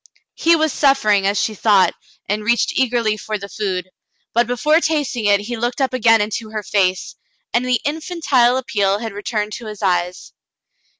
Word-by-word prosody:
He 335 Hz, +1 st, +3 dB
was 315 Hz, -2 st, 0 dB
suffering, 215 Hz, -9 st, +3 dB
as 200 Hz, +1 st, +1 dB
she 220 Hz, -, -1 dB
thought, 205 Hz, -2 st, +3 dB, 0.3 s
and 210 Hz, +2 st, -2 dB
reached 235 Hz, +2 st, +1 dB
eagerly 235 Hz, -4 st, +1 dB
for 215 Hz, 0 st, -4 dB
the 200 Hz, 0 st, -8 dB
food, 185 Hz, -3 st, -4 dB, 0.4 s
but 235 Hz, 0 st, +2 dB
before 300 Hz, +7 st, +2 dB
tasting 290 Hz, -9 st, -1 dB
it 205 Hz, -1 st, +3 dB
he 235 Hz, +4 st, -5 dB
looked 240 Hz, +3 st, -2 dB
up 265 Hz, -1 st, 0 dB
again 225 Hz, -3 st, +4 dB
into 215 Hz, +1 st, -3 dB
her 215 Hz, -1 st, -5 dB
face, 190 Hz, -2 st, 0 dB, 0.4 s
and 240 Hz, -, +2 dB
the 250 Hz, -2 st, +1 dB
infantile 290 Hz, -6 st, +1 dB
appeal 205 Hz, -7 st, 0 dB
had 225 Hz, -1 st, -6 dB
returned 210 Hz, +1 st, -3 dB
to 235 Hz, -, -10 dB
his 210 Hz, -1 st, -8 dB
eyes. 180 Hz, -1 st, -1 dB
220 Hz, 175 wpm, -19 LUFS, 205-255 Hz, 0.4 s, again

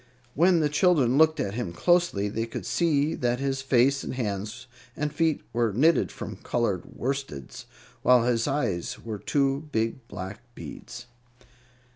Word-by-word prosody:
When 170 Hz, +3 st, +4 dB
the 150 Hz, -, +3 dB
children 145 Hz, -5 st, +3 dB
looked 160 Hz, 0 st, +5 dB
at 100 Hz, -, -1 dB
him 110 Hz, -7 st, -3 dB
closely, 175 Hz, -, +2 dB
they 115 Hz, +3 st, -2 dB
could 115 Hz, -, -6 dB
see 155 Hz, -3 st, +1 dB
that 120 Hz, 0 st, 0 dB
his 135 Hz, -1 st, -1 dB
face 135 Hz, +1 st, +3 dB
and -, -, -5 dB
hands 105 Hz, 0 st, -4 dB, 0.3 s
and 150 Hz, 0 st, -2 dB
feet 160 Hz, -2 st, +1 dB
were 115 Hz, -1 st, +1 dB
knitted 155 Hz, +10 st, +3 dB
from -, -, -7 dB
colored 105 Hz, -7 st, -2 dB
worsteds, 130 Hz, -, -4 dB, 0.4 s
while 125 Hz, -2 st, +5 dB
his 120 Hz, 0 st, +1 dB
eyes 135 Hz, -12 st, -1 dB
were 110 Hz, -3 st, -6 dB
two 140 Hz, +4 st, 0 dB
big 115 Hz, +1 st, -2 dB
black 95 Hz, +2 st, -7 dB, 0.2 s
beads. 120 Hz, 0 st, -9 dB
125 Hz, 150 wpm, -26 LUFS, 115-150 Hz, 0.4 s, looked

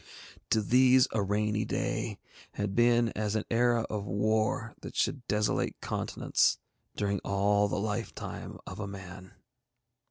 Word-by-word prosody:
To 110 Hz, -, +2 dB
these 130 Hz, +3 st, +5 dB
a 110 Hz, -, 0 dB
rainy 105 Hz, +2 st, 0 dB
day -, -, -2 dB, 0.4 s
had 105 Hz, -1 st, -2 dB
been 120 Hz, +1 st, +4 dB
as 105 Hz, -1 st, -2 dB
an 110 Hz, -, -1 dB
era 120 Hz, 0 st, +3 dB
of 105 Hz, -2 st, -3 dB
war 110 Hz, +3 st, 0 dB
that -, -, -8 dB
should 130 Hz, +3 st, 0 dB
desolate 105 Hz, 0 st, 0 dB
continents -, -, +1 dB, 0.4 s
during 100 Hz, -1 st, 0 dB
all 100 Hz, +1 st, +2 dB
the 100 Hz, -, -2 dB
lifetime 105 Hz, 0 st, -4 dB
of 95 Hz, -, -8 dB
a 105 Hz, -, -3 dB
man. 95 Hz, -1 st, -10 dB
105 Hz, 135 wpm, -30 LUFS, 100-115 Hz, 0.4 s, these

